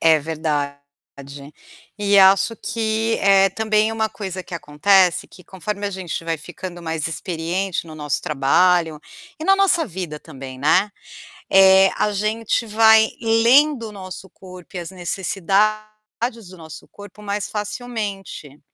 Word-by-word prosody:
É 160 -1 +5
verdade. 150 -2 -3 1.2
E 205 -1 +3
acho 195 +3 +5
que 225 0 -1
é 195 0 +4
também 215 +2 +1
uma 220 0 -1
coisa 190 -4 -6
que 180 - -9
acontece, 175 +4 +2
que 180 - -17
conforme 200 +3 -5
a - - -3
gente 185 -3 -5
vai 165 0 -2
ficando 175 +2 -9
mais 160 -2 -3
experiente 175 +2 -3
no 160 - -10
nosso 150 -2 -3
trabalho, 160 +3 +2 0.4
e - - -4
na 390 - +5
nossa 375 -4 +2
vida 175 -6 -6
também, 135 -4 -10
né, 185 +9 +2 0.6
eh, 190 0 +6
a 210 - +1
gente 215 +3 -1
vai 220 0 +5
lendo 235 +3 +3
o - - -11
nosso 190 -1 -9
corpo 185 0 -14
e - - -3
as 175 +1 -7
necessidades 215 +4 -2
do 185 - -13
nosso 160 -2 -11
corpo 205 0 -14
mais 200 0 -3
facilmente. 210 - -6
195 Hz, 140 wpm, -20 LUFS, 170-215 Hz, 1.2 s, eh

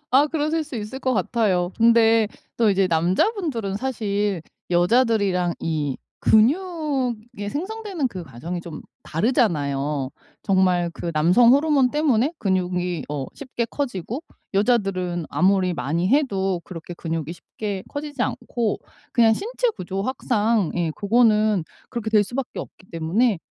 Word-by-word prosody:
아 275 +4 +5
그러실 310 +1 -1
수 285 -5 -7
있을 215 +5 -5
것 260 -2 0
같아요. 190 -3 +1
근데 230 -1 +5 0.3
또 225 -3 +4
이제 195 -1 +3
남자분들은 200 - 0
사실 205 -7 -1 0.3
여자들이랑 185 -2 +2
이 150 -4 -1 0.2
근육이 255 - +1
생성되는 375 - -3
그 185 -6 -7
과정이 165 +7 -6
좀 165 -3 -8 0.2
다르잖아요. 150 - 0 0.3
정말 185 -3 +2
그 170 - -4
남성 180 +11 +5
호르몬 285 -4 +3
때문에 295 -2 +2
근육이 180 -4 -1
어 140 -3 -3
쉽게 255 -4 -3
커지고 245 - -4 0.3
여자들은 195 -6 +1
아무리 185 -1 +2
많이 160 +6 -1
해도 195 - +1
그렇게 175 -1 -8
근육이 165 -2 -4
쉽게 200 +2 -6
커지지 290 -3 -4
않고 235 -4 -2 0.3
그냥 230 -3 +5
신체 485 - -1
구조학상 215 - -1
예 170 -2 0
그거는 215 -3 +3 0.2
그렇게 225 -2 -4
될 215 -2 +5
수밖에 245 +5 -5
없기 185 - -9
때문에 180 +7 +1
210 Hz, 290 characters per minute, -23 LUFS, 180-250 Hz, 0.3 s, 아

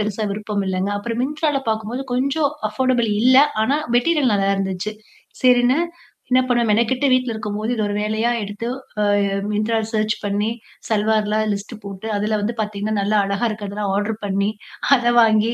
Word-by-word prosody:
பெருசா 215 +1 -2
விருப்பம் 205 -1 -3
இல்லங்க. 190 +1 -1
அப்புறம் 230 +3 -3
Myntraல 295 0 -1
பாக்கும்போது 220 +4 -3
கொஞ்சம் 275 +3 +1 0.2
அஃபர்டபிள் 245 0 +1
இல்ல. 255 +1 +6 0.3
ஆனா 275 +7 +2 0.2
மெட்டீரியல் 275 -1 +2
நல்லா 195 -1 +2
இருந்துச்சு. 195 +2 -3 0.5
சரின்னு 250 +2 +4 0.5
என்ன 255 +1 +5
பண்ணுவேன் 240 -2 +2
மெனக்கெட்டு 235 +5 +2
வீட்ல 255 -2 +2
இருக்கும்போது, 215 +1 -3
இது 220 - -1
ஒரு 205 - -2
வேலையா 220 +2 0
எடுத்து, 205 +3 -5 0.6
அ - - +1 0.2
Myntraல 215 +1 0
சர்ச் 215 -1 +1
பண்ணி 205 +1 0 0.4
சல்வார்லாம் 215 0 +1
லிஸ்ட்ட் 200 +3 -5
போட்டு, 200 +1 -7
அதில 210 +1 0
வந்து 215 +3 -2
பாத்தீங்கன்னா 210 0 -2
நல்லா 210 +2 +2
அழகா 200 +4 0
இருக்கதெல்லாம் 205 -1 -3
ஆர்டர் 210 +2 -2
பண்ணி, 200 +1 0 0.5
அத 240 -1 +1
வாங்கி 220 0 +4
215 Hz, 155 wpm, -21 LUFS, 205-240 Hz, 0.6 s, இல்ல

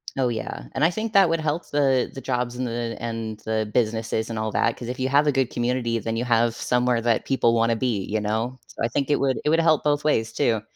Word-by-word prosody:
Oh, 130 -2 +1
yeah, 110 - -4
and 140 - -1
I 165 - +5
think 220 +3 -4
that 195 -2 +6
would 165 0 +1
help 155 +2 -2
the 135 -3 +2
the 135 - -7
jobs 125 -2 -2
and 125 0 -2
the 115 0 -3
and 115 -2 -4
the 110 -1 -1
businesses 110 -1 0
and 115 - -4
all 110 0 -2
that 115 - +1
'cause 120 - -7
if 125 +1 -5
you 130 0 0
have 145 +2 +4
a 145 - +3
good 135 -3 +1
community, 120 -1 -1
then 115 +1 -3
you 120 - -1
have 120 -1 +2
somewhere 125 0 +1
that 115 -1 +1
people 120 -3 +2
wanna 115 0 +2
be, 115 -4 -1
you 110 +3 -2
know, 110 +5 -2 0.2
I 115 - 0
think 140 +4 -1
it 145 - +2
would 135 -1 +1
it - - +1
would 165 +2 +3
help 160 -2 +3
both 145 0 +1
ways 115 -7 +1
too. 110 -2 +1
120 Hz, 255 wpm, -24 LUFS, 115-135 Hz, 0.2 s, that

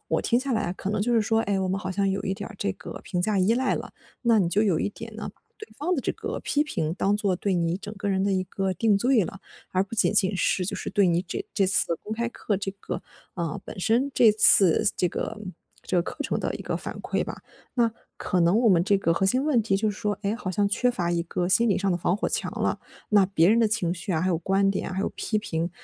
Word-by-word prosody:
我 - - 0
听 240 +1 +2
下 270 0 -2
来 220 - +1
啊 175 - -2
可 190 - -5
能 205 0 0
就 240 +3 0
是 230 - +4
说， 225 +1 +1
诶， 200 -2 0
我 190 - -1
们 190 +1 -1
好 185 -2 -4
像 195 +1 0
有 195 +1 -1
一 190 - -1
点 195 - -6
儿 225 - -12
这 200 -1 -1
个 185 -5 -9
评 180 -2 -2
价 200 +2 +1
依 190 +4 +3
赖 255 +2 +1
了。 - - -6 0.3
那 235 -3 +4
你 185 -4 +2
就 200 +5 +2
有 190 -7 +2
一 - - 0
点 225 +2 -10
呢， 220 - -6 0.3
对 430 0 -11
方 345 +5 0
的 295 - -1
这 - - -1
个 - - -5
批 295 +1 +1
评 160 - -2
当 200 +2 +1
做 200 -3 0
对 195 +1 -1
你 170 0 0
整 205 +2 -8
个 205 +1 -3
人 190 -1 +1
的 200 - +1
一 185 -1 +1
个 190 +1 -2
定 210 0 +2
罪 245 0 +3
了， 195 +2 -8 0.3
而 185 +1 +1
不 200 - -8
仅 215 - +2
仅 200 -2 +2
是 180 0 +1
就 - - -2
是 - - -5
对 200 -2 +3
你 170 0 +2
这 180 - -5
这 195 - +3
次 185 -2 +2
公 215 - -6
开 235 +1 -1
课 215 -3 -2
这 195 0 -4
个， - - -5 0.3
啊， 170 -4 -3
本 - - -9
身 235 +8 +1
这 230 -4 +5
次 210 -3 +6
这 180 - +1
个， 215 +5 -4 0.4
这 185 - -2
个 175 - +3
课 - - -7
程 - - -1
的 - - -2
一 - - -9
个 - - -2
反 - - -7
馈 - - -1
吧。 - - -7 0.3
那 235 -3 +2 0.2
可 180 - -1
能 170 +5 +4
我 235 -1 +4
们 175 -4 +4
这 200 0 +3
个 165 -3 +1
核 195 - 0
心 255 +8 +2
问 275 -7 +2
题 195 -2 +1
就 215 +2 0
是 205 - -8
说， 210 -2 -2
诶， 200 +1 0
好 225 -5 -4
像 200 +2 +1
缺 245 +5 +1
乏 175 -8 -2
一 170 -1 0
个 175 +1 -2
心 230 +5 +4
理 200 - +2
上 195 0 0
的 175 - +1
防 175 +2 +1
火 210 - -1
墙 - - -1
了， - - 0 0.3
那 205 -2 +5
别 180 -3 +3
人 225 +3 +4
的 225 - +3
情 180 -5 0
绪 185 +3 -4
啊， 160 - +1
还 185 - 0
有 175 - +2
观 195 +3 +2
点 195 - -2
啊， - - -5
还 190 - -1
有 - - 0
批 215 - -1
评， 170 -5 -3
200 Hz, 305 characters per minute, -25 LUFS, 185-220 Hz, 0.4 s, 次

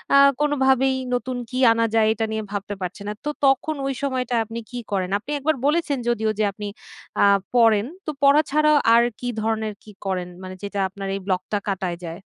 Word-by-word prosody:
আ - - +8 0.2
কোনোভাবেই 265 -2 +3 0.2
নতুন 250 0 -3
কি 255 - -4
আনা 230 0 +2
যায়, 220 -1 +4
এটা 225 0 -1
নিয়ে 220 0 -2
ভাবতে 205 0 -4
পারছেন 185 +3 -5
না। - - -2
তো - - 0 0.2
তখন 270 +3 +2
ওই 270 - -1
সময়টা 255 -3 -1
আপনি 230 +1 -6
কি 245 - -4
করেন? 190 -2 0
আপনি 290 - -9
একবার 310 +2 +1
বলেছেন 300 -3 +1
যদিও 220 -2 +1
যে - - +3
আপনি 205 +1 -7 0.6
আ - - +7 0.3
পড়েন, 225 -3 +5 0.2
তো 305 - -2
পড়া 280 +2 +7
ছাড়াও 305 0 +4 0.2
আর 235 0 +6 0.2
কি 245 - -4
ধরনের 220 -1 -1
কি 215 - -13
করেন? 180 -2 -2
মানে 185 0 -7
যেটা 200 0 -4
আপনার 195 0 -7
এই - - -3
ব্লগটা 190 +2 -1
কাটায় 185 -3 -2
যায়? 165 +3 -6
225 Hz, 200 wpm, -23 LUFS, 200-265 Hz, 0.6 s, আ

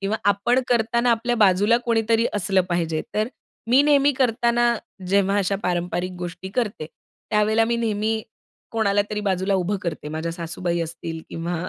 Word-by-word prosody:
किंवा 205 +3 -1
आपण 205 +6 +2
करताना 235 0 +2
आपल्या 240 +1 +1
बाजूला 205 +2 +4
कोणीतरी 230 0 +2
असलं 195 -1 +2
पाहिजे. 165 -2 -1
तर 215 +2 +1 0.4
मी 255 +3 +6
नेहमी 285 -1 +4
करताना, 240 -1 +2 0.3
जेव्हा 200 +1 +2
अशा 195 0 0
पारंपरिक 175 +1 -1
गोष्टी 180 +2 -6
करते, 210 -8 -2 0.4
त्यावेळेला 215 +1 +3
मी 235 +1 0
नेहमी 220 -1 -1 0.5
कोणाला 205 -3 +2
तरी 210 - -2
बाजूला 190 +1 +1
उभं 190 +2 0
करते, 160 -3 -4
माझ्या 160 +2 -3
सासूबाई 170 +1 -3
असतील 165 0 -5
किंवा 170 +1 -4
205 Hz, 150 wpm, -23 LUFS, 175-230 Hz, 0.5 s, मी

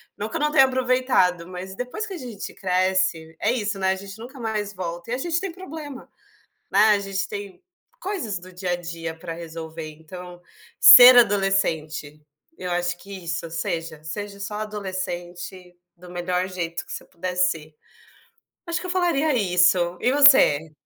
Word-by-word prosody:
não 210 +2 -5
que - - -8
eu - - 0
não 300 0 +1
tenha 270 -3 +6
aproveitado, 255 -9 +1
mas 185 +1 -8
depois 250 - -4
que 395 - -7
a - - -6
gente 235 -8 -7
cresce 185 -3 0
é 215 - +1
isso, 205 -5 -2
né, 190 0 +1
a - - 0
gente 195 +2 -10
nunca 255 +3 -10
mais 210 -3 -3
volta 175 +1 -6
e - - 0
a - - -3
gente 340 +4 -1
tem 390 -2 -4
problema, 310 -6 -9 0.6
né, 195 - +1
a 205 - +4
gente 195 0 -3
tem 200 - -8 0.4
coisas 345 - -3
do 185 +1 -14
dia 180 0 -4
a - - +1
dia 165 -1 -6
para 165 -1 -6
resolver. 160 -1 -7
Então, 175 +3 -11 0.4
ser 250 0 +11
adolescente, 165 -8 +1 0.3
eu 180 - -5
acho 175 0 -1
que 195 -2 -10
isso, 165 0 -4
seja, 165 -1 -4
seja 200 +5 -6
só 200 +1 -5
adolescente, 185 -3 -6 0.2
do 180 +1 -14
melhor 180 +1 -2
jeito 170 -2 -5
que - - -9
você - - -6
puder 180 +1 -6
ser. 160 -4 0 0.9
Acho 335 -2 -2
que - - -8
eu - - -6
falaria 335 -5 +1
isso 180 -4 +2
e 250 - +2
você? 260 - +6
190 Hz, 175 wpm, -23 LUFS, 175-230 Hz, 0.9 s, ser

